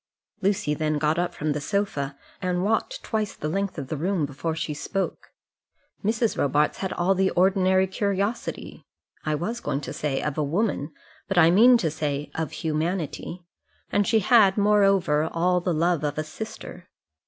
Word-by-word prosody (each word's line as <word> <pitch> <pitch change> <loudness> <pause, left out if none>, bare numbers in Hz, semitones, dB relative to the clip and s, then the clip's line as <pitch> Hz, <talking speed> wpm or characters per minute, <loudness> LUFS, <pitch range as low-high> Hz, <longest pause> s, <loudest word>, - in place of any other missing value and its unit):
Lucy 190 -6 +1
then 155 0 0
got 155 +3 +1
up 175 - 0
from 155 0 -2
the 145 0 -2
sofa, 145 -7 -2 0.2
and 180 -1 0
walked 225 - -1
twice 215 -2 -2
the 150 - -4
length 195 +4 -2
of 140 -3 -5
the - - -2
room 170 +1 0
before 145 +3 -4
she 160 -1 -3
spoke. 190 +6 -3 0.8
Mrs. 220 +2 +1
Robarts 145 +2 +1
had 190 - -2
all 175 +2 +2
the 190 0 +2
ordinary 190 0 +3
curiosity 200 +3 -3 0.4
I 155 - +2
was 215 +10 -3
going 145 0 -2
to - - -6
say, 140 -3 -1
of 150 0 -2
a - - +2
woman, 165 -1 -1 0.4
but 195 - -2
I 165 -1 +7
mean 240 +7 +7
to 165 -9 -1
say, 150 -2 -3
of 160 -2 -3
humanity; 165 +2 -3 0.5
and 205 -1 +2
she 220 -2 +3
had, 205 -3 +5
moreover, 195 -7 +3
all 180 +2 +1
the 180 - -1
love 170 0 +1
of 145 -1 -2
a 155 - 0
sister. 180 +1 -9
175 Hz, 175 wpm, -25 LUFS, 150-200 Hz, 0.8 s, I